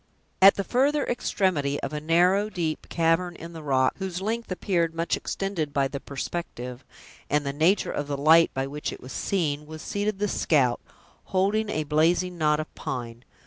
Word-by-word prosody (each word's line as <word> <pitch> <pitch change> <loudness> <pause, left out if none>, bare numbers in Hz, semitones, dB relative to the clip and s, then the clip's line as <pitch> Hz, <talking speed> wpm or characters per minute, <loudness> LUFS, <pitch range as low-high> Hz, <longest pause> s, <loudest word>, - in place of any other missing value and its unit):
At 195 +1 +9
the 200 - -2
further 275 +7 +2
extremity 160 -11 0
of 140 - -4
a 150 - -3
narrow, 180 +6 +3
deep 165 -6 -3
cavern 170 +1 +1
in 170 +1 -9
the 165 - -8
rock, 130 -3 +1
whose 190 -2 -3
length 225 +2 -3
appeared 170 -3 0
much 165 +1 0
extended 175 -7 -3
by 140 -1 +2
the 140 +1 -5
perspective 130 -4 -6 0.5
and 150 0 +1
the 140 - -2
nature 170 +7 +2
of 145 - -3
the 145 -1 -2
light 160 +4 +5
by 135 0 0
which 145 +2 -4
it - - -8
was 130 -1 -9
seen, 150 - -1
was 155 0 -9
seated 205 0 -2
the 210 +1 0
scout, 135 -10 +2 0.4
holding 205 +3 +1
a 155 -6 -1
blazing 165 +4 +2
knot 150 -1 +3
of 155 - -6
pine. 120 -2 -6
165 Hz, 185 wpm, -26 LUFS, 145-190 Hz, 0.5 s, At